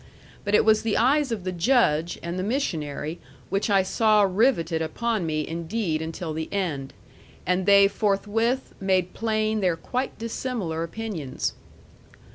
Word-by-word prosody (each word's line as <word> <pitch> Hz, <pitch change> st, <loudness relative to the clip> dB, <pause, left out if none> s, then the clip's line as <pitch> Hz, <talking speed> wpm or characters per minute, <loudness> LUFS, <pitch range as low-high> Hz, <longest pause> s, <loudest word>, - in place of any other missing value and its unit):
But 205 Hz, 0 st, +2 dB
it -, -, +4 dB
was 220 Hz, -1 st, +5 dB
the 225 Hz, -2 st, 0 dB
eyes 270 Hz, +2 st, +3 dB
of 215 Hz, -5 st, -3 dB
the 185 Hz, -, -2 dB
Judge 175 Hz, -, +2 dB
and 170 Hz, +2 st, -3 dB
the -, -, -1 dB
missionary 165 Hz, -, -2 dB, 0.3 s
which 195 Hz, +3 st, 0 dB
I 195 Hz, -2 st, +4 dB
saw 215 Hz, +2 st, +3 dB
riveted 185 Hz, -5 st, +2 dB
upon 210 Hz, +3 st, -1 dB
me 155 Hz, -1 st, -1 dB
indeed 165 Hz, 0 st, -2 dB
until 160 Hz, 0 st, -4 dB
the 160 Hz, 0 st, -4 dB
end; 160 Hz, -9 st, -2 dB, 0.5 s
and 180 Hz, +1 st, 0 dB
they 200 Hz, 0 st, +7 dB
forthwith 215 Hz, +5 st, 0 dB
made 185 Hz, -2 st, +1 dB
plain 215 Hz, -1 st, 0 dB
their 180 Hz, -3 st, +1 dB
quite 255 Hz, +9 st, -3 dB
dissimilar 225 Hz, -7 st, -3 dB
opinions. 170 Hz, -6 st, -4 dB
195 Hz, 145 wpm, -25 LUFS, 165-225 Hz, 0.5 s, they